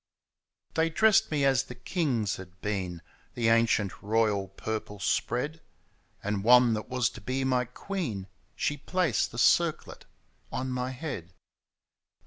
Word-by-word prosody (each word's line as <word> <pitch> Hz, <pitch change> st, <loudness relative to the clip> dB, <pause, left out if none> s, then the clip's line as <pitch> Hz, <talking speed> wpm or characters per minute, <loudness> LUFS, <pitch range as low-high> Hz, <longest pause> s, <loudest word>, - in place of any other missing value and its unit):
They 160 Hz, 0 st, +2 dB
dressed 215 Hz, +5 st, +4 dB
me 145 Hz, -3 st, +1 dB
as 135 Hz, -2 st, +4 dB
the 135 Hz, -2 st, -10 dB
kings 125 Hz, -, -1 dB
had 90 Hz, -1 st, -12 dB
been, 95 Hz, -5 st, -3 dB, 0.3 s
The 115 Hz, -2 st, +2 dB
ancient 115 Hz, -4 st, +2 dB
royal 105 Hz, -2 st, +1 dB
purple 105 Hz, +1 st, -5 dB
spread. 145 Hz, -, -1 dB, 0.6 s
And 105 Hz, -1 st, -1 dB
one 125 Hz, 0 st, +6 dB
that 110 Hz, 0 st, -4 dB
was 125 Hz, -2 st, +1 dB
to 110 Hz, -, -11 dB
be 130 Hz, +6 st, -2 dB
my 130 Hz, -1 st, +2 dB
queen. 125 Hz, -, -4 dB, 0.3 s
She 145 Hz, -, -1 dB
placed 160 Hz, -, 0 dB
the -, -, -9 dB
circlet -, -, +2 dB, 0.5 s
on 130 Hz, 0 st, -3 dB
my 125 Hz, 0 st, -2 dB
head. 125 Hz, -, -6 dB
125 Hz, 135 wpm, -29 LUFS, 105-135 Hz, 0.6 s, one